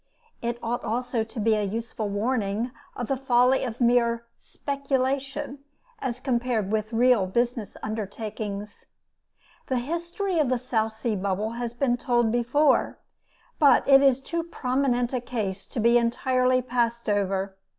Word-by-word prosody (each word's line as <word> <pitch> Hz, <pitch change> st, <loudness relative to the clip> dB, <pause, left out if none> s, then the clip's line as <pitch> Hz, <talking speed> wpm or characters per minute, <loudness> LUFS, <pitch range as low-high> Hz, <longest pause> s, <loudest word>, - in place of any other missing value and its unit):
It 235 Hz, 0 st, -2 dB
ought 235 Hz, +1 st, -2 dB
also 235 Hz, 0 st, -1 dB
to 225 Hz, +1 st, -8 dB
be 220 Hz, +1 st, +3 dB
a 215 Hz, -, +1 dB
useful 220 Hz, +1 st, -3 dB
warning 215 Hz, +1 st, -1 dB, 0.2 s
of 245 Hz, -, -3 dB
the 270 Hz, -, +1 dB
folly 255 Hz, 0 st, +3 dB
of 240 Hz, -3 st, -4 dB
mere 235 Hz, -1 st, +2 dB
"speculation," 275 Hz, 0 st, -2 dB, 0.4 s
as 250 Hz, -, -3 dB
compared 240 Hz, -5 st, 0 dB
with 215 Hz, 0 st, -1 dB
real 235 Hz, -4 st, +4 dB
"business 235 Hz, +1 st, -1 dB
undertakings." 210 Hz, -1 st, -5 dB, 0.8 s
The 260 Hz, -, 0 dB
history 340 Hz, +7 st, -2 dB
of 290 Hz, -5 st, +2 dB
the 255 Hz, -, +2 dB
South 225 Hz, -3 st, -1 dB
Sea 220 Hz, 0 st, -2 dB
Bubble 200 Hz, +3 st, -1 dB
has 235 Hz, 0 st, -4 dB
been 245 Hz, -1 st, +1 dB
told, 240 Hz, -2 st, +1 dB
before, 255 Hz, +5 st, +2 dB, 0.6 s
but 290 Hz, -3 st, +5 dB
it 275 Hz, -1 st, +8 dB
is 270 Hz, -2 st, +4 dB
too 335 Hz, +4 st, -2 dB
prominent 255 Hz, -5 st, 0 dB
a 250 Hz, -, 0 dB
case 205 Hz, -6 st, -4 dB
to -, -, -5 dB
be 235 Hz, +2 st, +5 dB
entirely 255 Hz, +2 st, +1 dB
passed 235 Hz, -1 st, -1 dB
over. 195 Hz, -1 st, 0 dB
240 Hz, 145 wpm, -26 LUFS, 220-255 Hz, 0.8 s, it